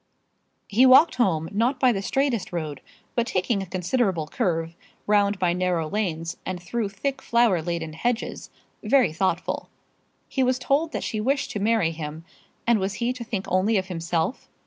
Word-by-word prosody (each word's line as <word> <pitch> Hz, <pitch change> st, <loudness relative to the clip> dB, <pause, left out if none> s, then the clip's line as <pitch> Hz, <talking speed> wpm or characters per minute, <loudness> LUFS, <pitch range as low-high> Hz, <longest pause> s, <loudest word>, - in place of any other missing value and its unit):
He 245 Hz, +6 st, +5 dB
walked 265 Hz, +6 st, +7 dB
home, 165 Hz, -9 st, +1 dB
not 235 Hz, +6 st, +1 dB
by 255 Hz, -1 st, +5 dB
the 195 Hz, -4 st, -2 dB
straightest 265 Hz, 0 st, 0 dB
road, 155 Hz, -6 st, -4 dB, 0.3 s
but 235 Hz, 0 st, 0 dB
taking 195 Hz, +3 st, 0 dB
a 190 Hz, -, -6 dB
considerable 185 Hz, -1 st, 0 dB
curve, 165 Hz, 0 st, -1 dB, 0.3 s
round 205 Hz, -1 st, +3 dB
by 180 Hz, -2 st, +1 dB
narrow 180 Hz, -3 st, 0 dB
lanes, 165 Hz, -4 st, -2 dB
and 185 Hz, -1 st, -4 dB
through 205 Hz, +4 st, -2 dB
thick 270 Hz, +7 st, -3 dB
flower 235 Hz, -7 st, +3 dB
laden 165 Hz, -1 st, -3 dB
hedges, 240 Hz, +8 st, -2 dB, 0.3 s
very 240 Hz, -, +3 dB
thoughtful. 190 Hz, +4 st, -1 dB, 0.6 s
He 265 Hz, -, -1 dB
was 255 Hz, 0 st, +2 dB
told 290 Hz, +5 st, +1 dB
that -, -, -2 dB
she 215 Hz, -, -2 dB
wished 275 Hz, +5 st, 0 dB
to 210 Hz, -, -3 dB
marry 210 Hz, -5 st, +2 dB
him; 160 Hz, 0 st, -7 dB, 0.4 s
and 235 Hz, -2 st, +4 dB
was 195 Hz, +1 st, -2 dB
he 235 Hz, +5 st, -1 dB
to 250 Hz, -2 st, -7 dB
think 210 Hz, -4 st, -4 dB
only 195 Hz, +4 st, +2 dB
of 190 Hz, 0 st, -2 dB
himself? 170 Hz, +4 st, -2 dB
195 Hz, 170 wpm, -25 LUFS, 170-240 Hz, 0.6 s, walked